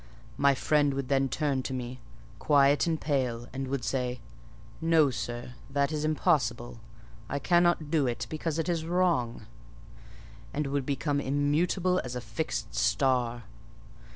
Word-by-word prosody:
My 140 Hz, -1 st, +5 dB
friend 145 Hz, 0 st, +2 dB
would 135 Hz, -1 st, -3 dB
then 135 Hz, -1 st, +2 dB
turn 140 Hz, -1 st, 0 dB
to 130 Hz, -, -4 dB
me, 125 Hz, 0 st, -5 dB, 0.4 s
quiet 145 Hz, +1 st, +4 dB
and 160 Hz, -2 st, 0 dB
pale, 125 Hz, -5 st, -1 dB
and 135 Hz, 0 st, -3 dB
would 135 Hz, -1 st, -2 dB
say, 125 Hz, -2 st, -1 dB, 0.6 s
'No, 160 Hz, -4 st, +4 dB
sir; 120 Hz, +1 st, -5 dB, 0.2 s
that 140 Hz, +1 st, +1 dB
is 155 Hz, -1 st, -2 dB
impossible: 125 Hz, -7 st, 0 dB, 0.5 s
I 140 Hz, -, -1 dB
cannot 175 Hz, 0 st, +2 dB
do 150 Hz, -5 st, +2 dB
it, 120 Hz, -, -2 dB
because 155 Hz, 0 st, -3 dB
it 165 Hz, -, -1 dB
is 170 Hz, -2 st, 0 dB
wrong;' 170 Hz, -9 st, 0 dB, 1.1 s
and 150 Hz, +1 st, 0 dB
would 140 Hz, -1 st, -2 dB
become 145 Hz, +1 st, 0 dB
immutable 160 Hz, +7 st, +1 dB
as 125 Hz, 0 st, -6 dB
a -, -, -2 dB
fixed 155 Hz, -, -4 dB
star. 120 Hz, -, +1 dB
140 Hz, 145 wpm, -29 LUFS, 125-155 Hz, 1.1 s, My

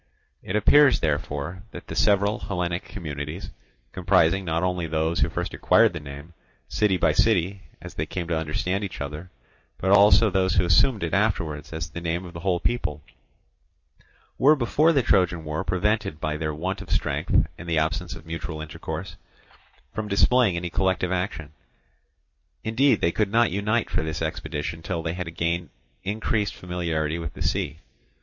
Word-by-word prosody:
It 95 Hz, -, -4 dB
appears 135 Hz, +6 st, +6 dB
therefore 75 Hz, +2 st, -2 dB
that -, -, -10 dB
the -, -, -7 dB
several 100 Hz, 0 st, +3 dB
Hellenic 90 Hz, -2 st, -3 dB
communities, 75 Hz, 0 st, -6 dB, 0.4 s
comprising 90 Hz, 0 st, +3 dB
not 80 Hz, 0 st, -1 dB
only 90 Hz, -2 st, -1 dB
those 80 Hz, +1 st, 0 dB
who -, -, +2 dB
first -, -, -4 dB
acquired -, -, +4 dB
the -, -, -4 dB
name, 70 Hz, +3 st, -10 dB, 0.3 s
city 105 Hz, -3 st, +1 dB
by 80 Hz, -3 st, +3 dB
city, 95 Hz, +1 st, +2 dB, 0.2 s
as -, -, -8 dB
they -, -, -3 dB
came 90 Hz, -3 st, -4 dB
to 85 Hz, -, +1 dB
understand 80 Hz, +5 st, -1 dB
each 95 Hz, -, -5 dB
other, 75 Hz, +5 st, -6 dB, 0.5 s
but 95 Hz, -, 0 dB
also 105 Hz, +2 st, +6 dB
those 95 Hz, -1 st, +1 dB
who 90 Hz, -1 st, +3 dB
assumed 100 Hz, -, +3 dB
it 85 Hz, -, -3 dB
afterwards 85 Hz, -8 st, 0 dB
as 80 Hz, 0 st, -4 dB
the 85 Hz, -, -6 dB
name 85 Hz, +2 st, -2 dB
of 85 Hz, -, -10 dB
the 85 Hz, -, -7 dB
whole 90 Hz, 0 st, 0 dB
people, 75 Hz, -, -2 dB, 1.4 s
were 150 Hz, +4 st, +6 dB
before 150 Hz, +5 st, +3 dB
the 140 Hz, -5 st, +2 dB
Trojan 90 Hz, -5 st, +2 dB
war 75 Hz, +3 st, -3 dB
prevented 95 Hz, -2 st, 0 dB
by 75 Hz, -1 st, -2 dB
their 80 Hz, 0 st, -2 dB
want 90 Hz, +6 st, -3 dB
of -, -, -10 dB
strength -, -, +1 dB
and 90 Hz, -, -7 dB
the 80 Hz, -, +1 dB
absence 80 Hz, +3 st, -1 dB
of 80 Hz, 0 st, -12 dB
mutual 80 Hz, -1 st, -5 dB
intercourse 80 Hz, +3 st, -6 dB, 0.8 s
from 110 Hz, -1 st, -3 dB
displaying 110 Hz, 0 st, +3 dB
any 85 Hz, 0 st, -4 dB
collective 95 Hz, -1 st, 0 dB
action. 90 Hz, -5 st, -3 dB, 1.1 s
Indeed, 125 Hz, +5 st, +3 dB
they 85 Hz, -, +3 dB
could 105 Hz, +2 st, 0 dB
not 115 Hz, +1 st, +3 dB
unite 105 Hz, +4 st, 0 dB
for -, -, +1 dB
this 80 Hz, +1 st, -3 dB
expedition 80 Hz, 0 st, -4 dB
till 85 Hz, 0 st, -3 dB
they 80 Hz, 0 st, -2 dB
had 90 Hz, -2 st, -5 dB
gained 85 Hz, -1 st, -1 dB, 0.3 s
increased 105 Hz, +1 st, -1 dB
familiarity 85 Hz, -3 st, -2 dB
with 80 Hz, -2 st, -5 dB
the -, -, -4 dB
sea. 80 Hz, -, -1 dB
90 Hz, 170 wpm, -25 LUFS, 80-100 Hz, 1.4 s, appears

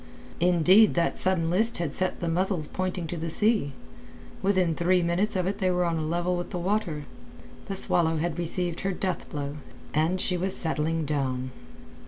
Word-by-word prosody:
Indeed 180 Hz, +5 st, +4 dB
that 170 Hz, -1 st, 0 dB
sudden 170 Hz, -3 st, +1 dB
list 225 Hz, +6 st, +4 dB
had 165 Hz, -5 st, -3 dB
set 185 Hz, 0 st, -2 dB
the 170 Hz, -, -2 dB
muzzles 175 Hz, -1 st, 0 dB
pointing 185 Hz, -2 st, -3 dB
to 170 Hz, +2 st, -5 dB
the 165 Hz, +1 st, -4 dB
sea; 210 Hz, -6 st, +4 dB, 0.7 s
within 185 Hz, -4 st, +1 dB
three 175 Hz, +2 st, +1 dB
minutes 180 Hz, +5 st, 0 dB
of 185 Hz, -1 st, 0 dB
it 195 Hz, +2 st, -3 dB
they 185 Hz, -, +1 dB
were 180 Hz, 0 st, +1 dB
on 170 Hz, -1 st, -1 dB
a -, -, -3 dB
level 175 Hz, +3 st, -1 dB
with 175 Hz, 0 st, -5 dB
the -, -, -5 dB
water. 175 Hz, -5 st, -2 dB, 0.6 s
The 195 Hz, -, -4 dB
Swallow 165 Hz, -3 st, +1 dB
had 170 Hz, +1 st, -3 dB
received 175 Hz, 0 st, -1 dB
her 195 Hz, 0 st, -2 dB
death 185 Hz, 0 st, -4 dB
blow, 145 Hz, 0 st, -5 dB, 0.4 s
and 160 Hz, +5 st, +1 dB
she 180 Hz, -1 st, 0 dB
was 185 Hz, +2 st, -2 dB
settling 160 Hz, -1 st, +1 dB
down. 130 Hz, -3 st, -2 dB
175 Hz, 185 wpm, -26 LUFS, 160-185 Hz, 0.7 s, Indeed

